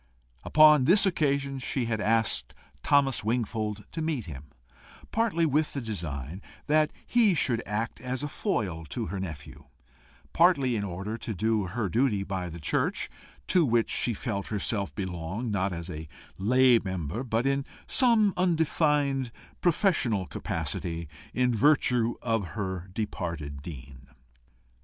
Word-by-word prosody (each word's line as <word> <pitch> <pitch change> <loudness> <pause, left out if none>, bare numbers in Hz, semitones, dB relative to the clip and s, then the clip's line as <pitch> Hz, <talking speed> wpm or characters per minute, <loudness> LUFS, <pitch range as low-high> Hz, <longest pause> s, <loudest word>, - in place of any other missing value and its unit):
Upon 150 -3 +6
this 195 +7 +5
occasion 140 -6 0
she 130 -1 -1
had 110 -2 -1
asked 110 - +1 0.3
Thomas 140 -5 +3
Wingfold 110 -2 -2
to 165 - -4
meet 155 -7 -1
him, 75 -4 -8 0.7
partly 215 -7 +1
with 150 +1 +1
the 140 - -2
design 85 - -5 0.2
that 155 0 +3
he 225 -6 +4
should 120 -6 +1
act 105 +3 -3
as 130 +2 -3
a - - -1
foil 105 - -2
to 75 - -4
her 100 - -2
nephew, 80 -6 -7 0.7
partly 150 -8 +4
in 105 - -1
order 100 +4 -4
to 110 -2 -5
do 110 +2 +1
her 105 +3 -2
duty 110 0 +1
by 95 -2 -3
the 85 +1 -8
church, 75 - -1 0.3
to 180 - +3
which 120 -5 +2
she 120 - +1
felt 100 -4 -3
herself 100 -1 -2
belong 95 +4 -4
not 95 -1 0
as 85 -1 -5
a 80 -3 -6 0.3
lay 125 +4 +5
member, 95 - -4
but 115 -1 0
in 135 0 +1 0.2
some 230 -6 +4
undefined 150 -7 +1 0.3
professional 150 - +2
capacity, 85 -1 -4 0.2
in 125 0 +1
virtue 125 -2 +3
of 115 -3 +1
her 95 -3 -3
departed 85 -9 -4
dean. 70 -3 -10
115 Hz, 140 wpm, -28 LUFS, 95-140 Hz, 0.7 s, Upon